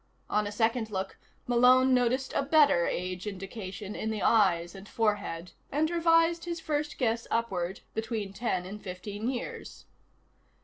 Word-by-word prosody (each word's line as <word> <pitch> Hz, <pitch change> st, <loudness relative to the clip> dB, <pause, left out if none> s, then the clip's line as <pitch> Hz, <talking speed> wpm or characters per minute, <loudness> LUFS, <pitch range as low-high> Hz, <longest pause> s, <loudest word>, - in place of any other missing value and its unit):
On 210 Hz, 0 st, +1 dB
a -, -, -4 dB
second 225 Hz, +1 st, 0 dB
look, 190 Hz, -2 st, -4 dB, 0.3 s
Malone 255 Hz, +2 st, +5 dB
noticed 255 Hz, +1 st, +1 dB
a -, -, +2 dB
better 285 Hz, -, +4 dB
age 180 Hz, +2 st, -3 dB
indication 195 Hz, 0 st, -6 dB
in 220 Hz, -, -3 dB
the 215 Hz, -2 st, -2 dB
eyes 175 Hz, -6 st, +3 dB
and 195 Hz, +1 st, -11 dB
forehead, 205 Hz, -6 st, -1 dB, 0.2 s
and 310 Hz, +3 st, +1 dB
revised 330 Hz, 0 st, +3 dB
his 340 Hz, -1 st, -3 dB
first 300 Hz, -1 st, -2 dB
guess 230 Hz, -2 st, 0 dB
upward 190 Hz, -6 st, -1 dB
between 220 Hz, -3 st, -3 dB
ten 190 Hz, -4 st, -1 dB
and 205 Hz, +3 st, -8 dB
fifteen 205 Hz, +4 st, -5 dB
years. 250 Hz, -2 st, -6 dB
220 Hz, 145 wpm, -29 LUFS, 195-255 Hz, 0.3 s, Malone